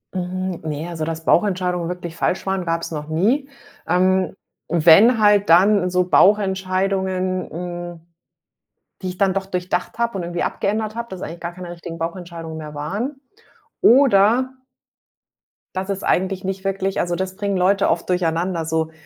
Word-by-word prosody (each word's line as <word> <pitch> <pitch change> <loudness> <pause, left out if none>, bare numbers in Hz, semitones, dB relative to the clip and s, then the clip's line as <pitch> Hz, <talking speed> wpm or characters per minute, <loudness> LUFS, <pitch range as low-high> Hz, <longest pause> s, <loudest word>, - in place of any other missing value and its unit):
Mhm, 185 0 -3
ne, 155 +1 -4
also 160 -2 -4
dass 160 0 -5
Bauchentscheidungen 180 -3 +1
wirklich 175 -2 -6
falsch 180 - -1
waren, 190 -2 -1
gab's 165 0 -2
noch 150 -2 -5
nie. 230 - +1 0.4
Ähm, 185 +1 +2 0.3
wenn 175 +9 +6
halt 205 -2 +4
dann 185 +2 +5
so 180 0 +1
Bauchentscheidungen, 190 -1 +1
hm, 175 0 -6 1.0
die 185 - -3
ich 180 - -7
dann 195 -1 +2
doch 195 0 -2
durchdacht 180 +1 -3
habe 235 -3 0
und 180 - -3
irgendwie 170 0 -3
abgeändert 215 +2 -2
habe, 235 0 -5
das 190 -1 -8
eigentlich 170 +1 -7
gar 170 - -4
keine 180 -1 -8
richtigen 170 -1 -8
Bauchentscheidungen 165 -1 -6
mehr 150 -1 -8
waren. 205 - -4 0.6
Oder 245 0 +5 1.2
dass 190 +1 -3
es 195 0 -3
eigentlich 190 +1 0
nicht 190 0 -4
wirklich 195 0 -1
also, 175 0 -1
das 185 +1 -4
bringen 200 -1 -1
Leute 195 +2 +3
oft 165 0 -1
durcheinander, 175 -1 0
so 160 0 -1
185 Hz, 155 wpm, -21 LUFS, 170-195 Hz, 1.2 s, wenn